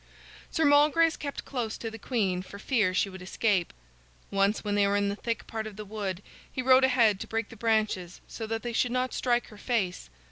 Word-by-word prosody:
Sir 320 - +1
Malgrace 300 +3 +5
kept 285 -1 -6
close 240 -5 -3
to 225 - -5
the 225 - -9
queen 200 -7 0
for 190 +2 -10
fear 215 -3 +1
she 200 +2 +1
would 190 -1 -9
escape. 190 -1 0 0.6
Once 200 +2 +2
when 205 -1 -1
they 205 -1 +3
were 200 - +1
in 200 0 +1
a - - -3
thick 230 +2 -3
part 220 -1 -4
of 215 - -9
the 210 +1 -7
wood 200 -2 -4 0.3
he 255 - -3
rode 260 +1 +6
ahead 235 -6 +4
to - - -6
break 225 -1 -2
the - - -11
branches 215 -5 0
so 225 - -6
that 225 0 -3
they 240 -1 -3
should 240 +2 +1
not 255 +1 0
strike 240 -1 0
her 210 - -13
face. 195 - -1
220 Hz, 220 wpm, -28 LUFS, 200-245 Hz, 0.6 s, rode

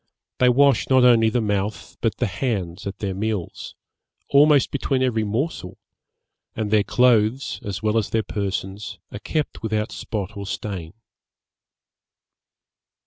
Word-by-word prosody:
They 125 - +5
wash 140 0 +3
not 130 -1 +5
only 115 -3 +5
the 120 +2 0
mouth, 105 0 -2
but 115 - 0
the 125 - 0
hands 100 -3 -3
at 100 0 -5
their 100 -2 -3
meals, 105 -2 -4 0.5
almost 145 0 +5
between 135 -1 0
every 115 -4 +1
morsel; 110 - -3 0.8
and 110 -2 -3
their 110 -1 +5
clothes, 120 +2 +2
as 100 -1 -5
well 110 +1 +2
as 105 - -3
their 110 -1 0
persons, 100 0 -4
are 105 - -7
kept 155 +6 -3
without 110 -1 -2
spot 105 -1 -5
or 100 -1 -6
stain.' 95 -5 -5
110 Hz, 140 wpm, -23 LUFS, 100-125 Hz, 0.8 s, They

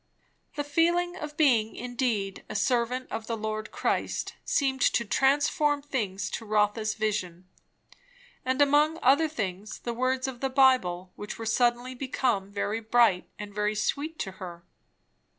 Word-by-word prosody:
The 290 - -1
feeling 345 +4 +1
of 300 -4 -7
being 235 -8 +3
indeed 235 -6 -2
a - - -6
servant 245 +3 0
of 220 0 -4
the 230 - -2
Lord 215 0 -4
Christ - - -1
seemed 265 -2 0
to 235 - +3
transform 285 +5 +2
things 205 -9 -3
to - - -4
Rotha's 215 0 +1
vision. 185 -5 -2 1.0
And 260 +2 +3
among 295 +3 +3
other 280 +5 +5
things, 205 - -4
the 235 - -4
words 255 +2 0
of 255 -2 -6
the 270 - -1
Bible, 250 -10 +3
which 205 - -7
were 225 - -6
suddenly 240 +2 +1
become 245 -6 -1
very 205 +2 -2
bright 225 -4 +3
and 210 -1 -8
very 210 +1 0
sweet 295 +9 -2
to 190 - -3
her. 170 -2 -8
240 Hz, 150 wpm, -28 LUFS, 210-270 Hz, 1.0 s, other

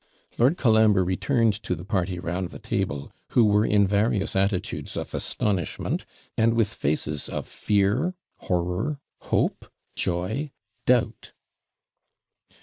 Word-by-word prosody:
Lord 130 +9 +4
Colambre 110 -5 +4
returned 115 +5 +2
to 90 - -2
the 85 +2 -9
party 95 -3 -1
round 90 +1 -3
the - - -9
table, 70 -1 -3 0.2
who 120 - +6
were 105 0 +4
in 105 -1 +4
various 100 0 +1
attitudes 95 -1 -1
of - - -5
astonishment, 95 -6 -1 0.3
and 115 +1 +3
with 115 -2 +1
faces 75 -2 -1
of - - -4
fear, 105 - +1 0.2
horror, 90 - -1 0.2
hope, - - -1 0.3
joy, 95 - -1 0.4
doubt. 120 -3 +1
100 Hz, 120 wpm, -25 LUFS, 90-115 Hz, 0.4 s, who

